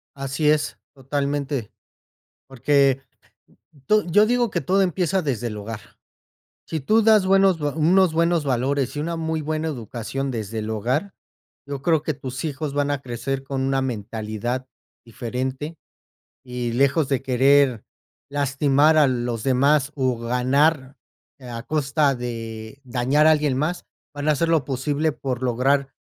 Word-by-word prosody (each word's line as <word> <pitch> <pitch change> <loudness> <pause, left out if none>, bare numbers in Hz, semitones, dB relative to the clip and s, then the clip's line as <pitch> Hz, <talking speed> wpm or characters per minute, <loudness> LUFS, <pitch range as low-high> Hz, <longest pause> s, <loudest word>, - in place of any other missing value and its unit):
Así 135 +2 -1
es 150 -1 0 0.2
totalmente. 140 -2 -3 0.8
Porque 135 +1 +2 0.8
to 215 0 +3
yo 205 +5 +4
digo 240 0 +1
que - - -1
todo 195 +1 +2
empieza 185 +1 0
desde 120 -5 -2
el 105 - -6
hogar. 105 +1 -6 0.9
Si 160 -2 -3
tú 215 +11 +3
das 215 -3 +5
buenos, 195 -3 +4
unos 160 +5 +3
buenos 170 -1 +2
valores 135 +1 0
y - - -1
una 165 +2 -2
muy 160 -1 -2
buena 155 +1 -2
educación 130 +1 -4
desde 110 -2 -4
el 110 +1 -4
hogar, 130 - -1 0.5
yo 140 -1 -6
creo 160 -2 +2
que 155 - -2
tus 130 +1 -6
hijos 145 -1 -3
van 145 0 0
a 145 -1 -1
crecer 130 +2 -4
con 135 -1 -3
una 135 0 +1
mentalidad 115 +1 -4 0.4
diferente, 130 +6 -4 0.7
y 125 -2 -4
lejos 140 +4 +2
de 135 -3 0
querer 135 -2 +3 0.5
lastimar 145 +2 +3
a 150 -2 +6
los 120 -3 -2
demás, 140 +2 +2
o 130 -4 0
ganar 130 +4 +1 0.4
a 120 -2 -7
costa 145 -1 +1
de 115 +1 -6
dañar 130 +5 +2
a 160 - +7
alguien 150 -4 +1
más, 165 +5 -2 0.3
van 145 +1 -3
a 155 - +5
hacer 165 +3 0
lo 160 -4 +2
posible 145 +3 -1
por 130 -3 -4
lograr 135 +3 +1
140 Hz, 145 wpm, -23 LUFS, 125-155 Hz, 0.9 s, a